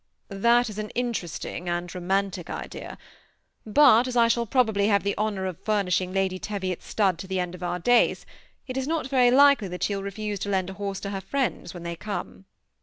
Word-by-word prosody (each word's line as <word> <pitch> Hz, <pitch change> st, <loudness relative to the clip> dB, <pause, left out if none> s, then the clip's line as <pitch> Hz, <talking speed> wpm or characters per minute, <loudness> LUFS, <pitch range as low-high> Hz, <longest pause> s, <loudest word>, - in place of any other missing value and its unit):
^ 195 Hz, -, -6 dB
That 240 Hz, +2 st, +4 dB
is 215 Hz, -1 st, -6 dB
an 215 Hz, 0 st, -4 dB
interesting 185 Hz, -7 st, -3 dB
and 175 Hz, 0 st, -3 dB
romantic 185 Hz, -1 st, -1 dB
idea; -, -, -7 dB, 0.7 s
but 255 Hz, 0 st, +6 dB
as 250 Hz, -1 st, -2 dB
I 230 Hz, -1 st, +5 dB
shall 235 Hz, 0 st, +1 dB
probably 220 Hz, -5 st, +2 dB
have 200 Hz, -2 st, +3 dB
the 200 Hz, 0 st, 0 dB
honor 205 Hz, -3 st, -1 dB
of 185 Hz, -3 st, -4 dB
furnishing 185 Hz, -4 st, 0 dB
Lady 190 Hz, -1 st, 0 dB
Teviot's 190 Hz, -4 st, -4 dB
stud 190 Hz, -5 st, +1 dB
to 190 Hz, -, -7 dB
the 190 Hz, 0 st, -1 dB
end 180 Hz, -1 st, -2 dB
of 180 Hz, -, -10 dB
our 175 Hz, 0 st, -2 dB
days, 245 Hz, +7 st, +3 dB, 0.4 s
it 255 Hz, -1 st, -5 dB
is 265 Hz, 0 st, -2 dB
not 320 Hz, -3 st, -1 dB
very 255 Hz, -2 st, +4 dB
like 280 Hz, +1 st, +6 dB
ly 200 Hz, -, -4 dB
that 180 Hz, 0 st, -5 dB
she 205 Hz, -, 0 dB
will 195 Hz, -, -3 dB
refuse 205 Hz, +1 st, -4 dB
to 205 Hz, -, -3 dB
lend 190 Hz, -1 st, 0 dB
a 190 Hz, -, -11 dB
horse 195 Hz, -1 st, -3 dB
to 200 Hz, -, -4 dB
her 195 Hz, -1 st, -4 dB
friends 245 Hz, -5 st, -2 dB
when 175 Hz, -, -8 dB
they 170 Hz, 0 st, -4 dB
come." 200 Hz, 0 st, -6 dB
200 Hz, 220 wpm, -26 LUFS, 185-235 Hz, 0.7 s, but